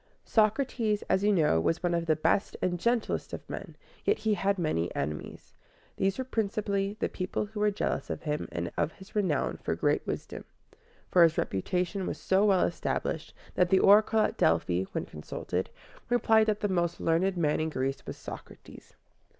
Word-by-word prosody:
Socrates, 220 -1 +1
as 190 - +2
you 210 - +4
know, 155 - +3
was 165 - 0
one 175 -1 +1
of 170 -1 -1
the 155 - +4
best 180 +6 +1
and 175 -1 -1
gentlest 235 +3 0
of - - -7
men, - - -7 0.3
yet 420 - +2
he 220 -1 0
had 200 +1 +1
many 155 - 0
enemies. 75 +2 -5 0.4
These 195 0 +1
were 260 - -1
principally 205 -4 -1
the - - +1
people 185 +2 -3
who 210 +1 -8
were 210 0 +3
jealous 205 - -2
of - - -4
him 150 -2 -2
and 85 0 -3
of 150 - 0
his 190 +2 -15
renown 185 -8 0
for - - -2
great - - 0
wisdom; - - -5 0.7
for 180 - +5
his 165 -1 +5
reputation 180 - -1
was - - -3
so 190 +1 +2
well 195 -3 +4
established, - - -3 0.2
that 180 -1 +2
the 190 - +5
oracle 215 +3 +5
at - - 0
Delphi, 90 +2 +2
when - - -3
consulted, 90 +4 -4 0.4
replied 220 -2 +4
that 210 -1 0
the 205 - +1
most 175 -3 0
learned 175 +3 +1
man 150 -3 +1
in 160 0 0
Greece 135 -2 -2
was - - -6
Socrates. - - -11
190 Hz, 185 wpm, -29 LUFS, 160-210 Hz, 0.7 s, for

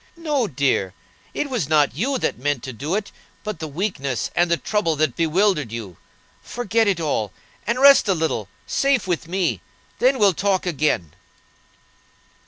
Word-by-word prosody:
"No, 295 -8 0
dear; 130 - 0 0.4
it 295 - -2
was 235 - -2
not 150 -4 +3
you 255 - -1
that 235 - -2
meant 145 -2 -1
to 130 - -6
do 145 - -3
it, 210 -1 -3 0.3
but 210 -6 -5
the 160 - -4
weakness 140 - -2
and 175 0 +3
the 170 - +2
trouble 200 -6 0
that 155 +1 0
bewildered 165 - +1
you. 110 -6 -6 0.5
Forget 230 -2 0
it 195 -4 +1
all, 140 - -1 0.4
and 235 +3 0
rest 275 -3 +7
a 195 - +3
little, 155 - -2 0.2
safe 275 -4 +1
with 175 -3 -2
me; 170 - -1 0.4
then 260 +2 +4
we'll 205 -5 +4
talk 190 +2 0
again." 150 - 0
170 Hz, 165 wpm, -22 LUFS, 140-210 Hz, 0.5 s, rest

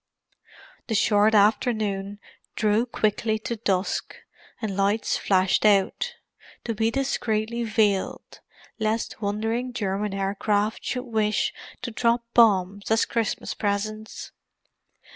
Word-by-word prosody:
The 225 - -1
short 210 +1 +4
afternoon 205 -2 +1 0.4
drew 215 +3 +2
quickly 220 -1 0
to 235 - -2
dusk, 195 -4 -1 0.4
and 215 -4 -3
lights 200 +3 +1
flashed 190 -1 +2
out—to 215 - -1
be 220 +1 +1
discreetly 235 -3 -1
veiled, 210 -3 0 0.4
lest 220 0 -2
wandering 225 +5 -2
German 200 -2 -2
aircraft 205 +2 0
should 250 0 -3
wish 215 -3 0 0.3
to 245 - -3
drop 235 +1 +1
bombs 200 -3 +3
as 225 0 +3
Christmas 230 -3 -2
presents. 215 +1 -3
215 Hz, 105 wpm, -25 LUFS, 200-230 Hz, 0.4 s, short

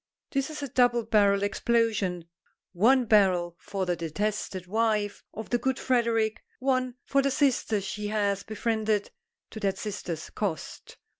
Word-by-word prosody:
This 275 0 0
is 300 -2 -6
a - - -2
double 240 -2 +3
barrelled 200 -3 +3
explosion. 205 -5 0 0.5
One 245 +8 +4
barrel 185 -6 +3
for 195 -2 -3
the 175 -1 0
detested 185 +3 -3
wife 215 0 0
of 220 0 -8
the 240 - +2
good 265 0 0
Frederic, 230 -4 +1 0.2
one 255 -2 0
for 275 - +2
the 275 - +1
sister 260 -6 +1
she 205 +2 -4
has 205 -2 0
befriended 215 -1 -1 0.4
to 220 - -7
that 195 -2 0
sister's 185 -6 -5
cost. 185 -8 -5
215 Hz, 145 wpm, -27 LUFS, 200-240 Hz, 0.5 s, One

